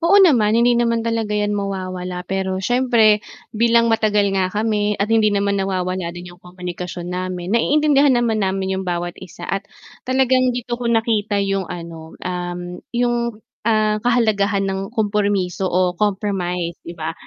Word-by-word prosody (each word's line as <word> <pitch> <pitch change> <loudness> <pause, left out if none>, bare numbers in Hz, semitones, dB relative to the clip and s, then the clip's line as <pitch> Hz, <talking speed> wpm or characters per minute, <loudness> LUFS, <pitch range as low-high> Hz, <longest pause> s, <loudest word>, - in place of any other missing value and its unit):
Oo 350 +4 +4
naman, 235 - +5
hindi 240 +1 +4
naman 230 -1 +1
talaga 225 -2 -1
'yan 210 0 0
mawawala. 185 -3 -4
Pero 190 0 -2
siyempre 225 0 +3 0.3
bilang 230 0 +3
matagal 210 -3 +2
nga 190 -1 +1
kami 210 0 0
at 210 +3 0
hindi 220 -1 +4
naman 200 -1 0
nawawala 185 -2 -2
din 175 +1 -9
'yong 175 - -19
komunikasyon 180 -1 -7
namin, 180 0 -4
naiintindihan 285 +2 +4
naman 230 -3 +1
namin 190 -1 -1
'yong 190 - -5
bawat 175 0 -2
isa 175 -1 -10
at 195 - -2 0.5
talagang 255 -1 +2
dito 240 0 -4
ko 240 - -1
nakita 220 -2 +1
'yong, 195 -2 -1
ano, 165 -2 -8
um, 180 0 -4 0.2
'yong, 235 -2 -1 0.2
ah, 215 -1 +2
kahalagahan 210 -4 +2
ng 195 0 -3
kompromiso 205 -4 0
o 180 0 +1
compromise, 180 -4 -2
'di 170 - -10
ba. 160 0 -3
200 Hz, 155 wpm, -20 LUFS, 185-230 Hz, 0.5 s, naman